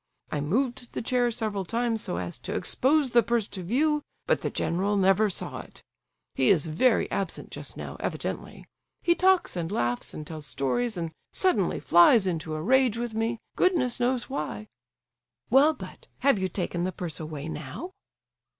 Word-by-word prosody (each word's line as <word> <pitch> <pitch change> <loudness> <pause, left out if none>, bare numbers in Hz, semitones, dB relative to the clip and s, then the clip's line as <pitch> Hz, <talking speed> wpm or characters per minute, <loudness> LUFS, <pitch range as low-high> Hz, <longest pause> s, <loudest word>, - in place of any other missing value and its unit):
I 150 - -1
moved 245 - -1
the - - -3
chair 245 0 +2
several 215 -4 -2
times 230 +3 -1
so 85 - -3
as 85 -1 -5
to - - -5
expose 275 0 +2
the 235 - +6
purse 235 -2 0
to 190 - -6
view, 295 - +1 0.2
but - - +2
the - - -1
general 195 +4 0
never 195 +2 +4
saw 190 - -1
it. - - -11 0.5
He 130 - +2
is 170 -6 +4
very 200 +10 +2
absent 195 -4 -3
just - - -7
now, - - -7
evidently. - - -4 0.4
He 345 - +4
talks 375 - +3
and 170 0 -3
laughs 120 - -1
and 155 - -7
tells 155 -2 -7
stories, 210 - -1
and 165 -2 -3 0.2
suddenly 220 - +1
flies 185 +5 +6
into 160 -3 -2
a 155 - -4
rage 255 +1 +3
with 235 -1 -3
me, 225 +1 -1 0.2
goodness 290 -11 +2
knows 245 0 +1
why." 110 - -4 0.8
"Well, 280 +5 +6
but—have 275 -6 -2
you 190 0 -1
taken 175 -2 -2
the 185 - -1
purse 170 -2 -5
away 155 -2 -6
now?" 155 - -6
210 Hz, 170 wpm, -27 LUFS, 165-250 Hz, 0.8 s, the